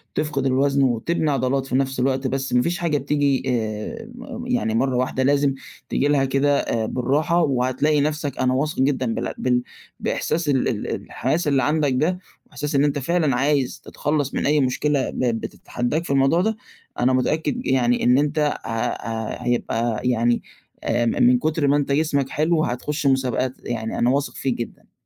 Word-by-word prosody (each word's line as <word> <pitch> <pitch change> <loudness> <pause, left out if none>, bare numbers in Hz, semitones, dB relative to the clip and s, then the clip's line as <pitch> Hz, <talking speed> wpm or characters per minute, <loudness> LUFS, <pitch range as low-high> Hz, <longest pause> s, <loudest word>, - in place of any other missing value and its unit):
تفقد 150 -3 -1
الوزن 135 +1 +2
وتبني 145 +6 +1
عضلات 135 0 0
في 130 - -3
نفس 135 -1 0
الوقت، 130 +1 +1
بس 135 +1 -2
ما 125 - +4
فيش 170 +5 -1
حاجة 160 -4 +1
بتيجي 140 -1 +1
آآ، 110 - -3
م 245 -1 -8
يعني 240 - 0
مرّة 130 +2 +1
واحدة 130 +1 0
لازم 140 0 +3 0.4
تيجي 145 - +1
لها 145 -2 +3
كده 140 +2 +2
آآ، 110 -1 -1
بالراحة، 150 +9 +1
وهتلاقي 135 +2 +1
نفسك 150 -2 -2
أنا 130 0 +2
واثق 150 +3 -1
جدًا 130 -3 +1
بالع - - -3
بال 125 -1 +1 0.4
بإحساس 160 -2 -1
ال 130 -2 +2
ال 110 -4 -2 0.2
الحماس 165 -1 -1
اللي 135 -3 +2
عندك 150 -1 +1
ده 170 +8 +1 0.3
وبإحساس 145 +1 -4
إن 140 - +4
أنت 145 -1 +1
فعلًا 155 -2 +1
عايز 140 0 0
تتخلّص 145 -2 -2
من - - -1
أي 150 +1 +3
مشكلة 135 +1 +1
ب - - -7 0.2
بتتحدّاك 120 +7 -3
في - - -7
الموضوع 140 +5 +3
ده، 220 +2 0 0.4
أنا 125 +1 +3
متأكد 160 - 0
يعني 125 -2 +2
إن 125 +2 +5
أنت 150 +2 +1 0.3
ه - - -5
ه 115 0 -3
هيبقى 120 -2 -1
يعني 120 -1 +2 0.4
آآ، 120 - +1
م - - +3
من 125 +1 +6
كُتر 155 0 0
ما 140 - +4
أنت 140 -1 -1
جسمك 140 -2 +1
حلو 155 +2 +1
هتخُشّ 140 +5 -3
مسابقات، 130 -1 +1
يعني 115 -2 -3
أنا 120 - +3
واثق 140 +2 0
فيك 135 - -1
جدًا. 120 0 -8
135 Hz, 180 wpm, -22 LUFS, 125-150 Hz, 0.4 s, من